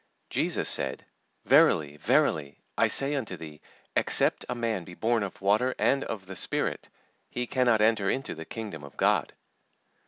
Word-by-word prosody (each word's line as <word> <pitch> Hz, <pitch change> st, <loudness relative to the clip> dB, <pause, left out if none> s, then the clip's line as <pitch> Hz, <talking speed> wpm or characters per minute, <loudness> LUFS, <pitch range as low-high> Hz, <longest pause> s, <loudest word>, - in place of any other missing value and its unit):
JESUS -, -, 0 dB
said, -, -, +2 dB, 0.4 s
"Verily, 75 Hz, -1 st, +4 dB
verily, 75 Hz, -1 st, +1 dB, 0.2 s
I -, -, +3 dB
say 140 Hz, +1 st, +4 dB
unto 115 Hz, -10 st, -3 dB
thee, 75 Hz, -2 st, -11 dB, 0.3 s
Except -, -, +2 dB
a 125 Hz, -, -2 dB
man 115 Hz, -6 st, -2 dB
be 90 Hz, +1 st, -12 dB
born 115 Hz, +2 st, 0 dB
of 100 Hz, -2 st, -5 dB
water 110 Hz, +6 st, +2 dB
and 135 Hz, 0 st, +2 dB
of 100 Hz, -4 st, -6 dB
the 95 Hz, 0 st, -9 dB
Spirit, -, -, -2 dB, 0.4 s
he 125 Hz, -, -3 dB
cannot 120 Hz, -3 st, +2 dB
enter 110 Hz, -3 st, +2 dB
into 135 Hz, -, -2 dB
the 80 Hz, -, -8 dB
Kingdom 105 Hz, -9 st, -7 dB
of 70 Hz, -, -13 dB
God. -, -, +1 dB
105 Hz, 160 wpm, -27 LUFS, 85-120 Hz, 0.4 s, Verily